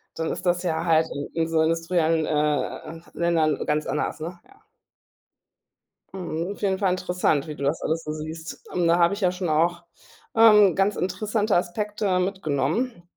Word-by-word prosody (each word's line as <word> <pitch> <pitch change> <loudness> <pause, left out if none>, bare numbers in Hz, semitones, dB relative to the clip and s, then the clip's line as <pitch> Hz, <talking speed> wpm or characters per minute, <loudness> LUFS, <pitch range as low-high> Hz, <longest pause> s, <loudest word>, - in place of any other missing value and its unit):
dann 160 0 -2
ist - - -4
das 175 +1 +1
ja 165 -2 -1
halt 160 -1 +3
in 145 0 -5
in - - -1
so 160 -1 +1
industriellen, 165 0 +1
äh, 150 +2 -1
Ländern 165 -3 +1
ganz 150 0 0
anders, 150 +2 -2
ne, 175 +3 -6
ja. 400 0 -23 1.5
Mhm, 180 0 -4
auf - - -16
jeden 190 -2 0
Fall 195 -3 +2
interessant, 180 -4 0
wie 150 - -6
du - - -6
das 145 +4 0
alles 165 +1 -1
so 150 - -4
siehst. 155 +1 -7
Ähm, 175 -2 +1
da 170 +1 +4
habe 170 +2 +4
ich 200 - -5
ja 180 -1 +3
schon 180 -2 -3
auch, 170 +3 +1 0.5
ähm, 210 -5 +7
ganz 195 +2 +2
interessante 210 +3 -1
Aspekte 195 +2 0
mitgenommen, 180 - -1
170 Hz, 175 wpm, -24 LUFS, 160-190 Hz, 1.5 s, ähm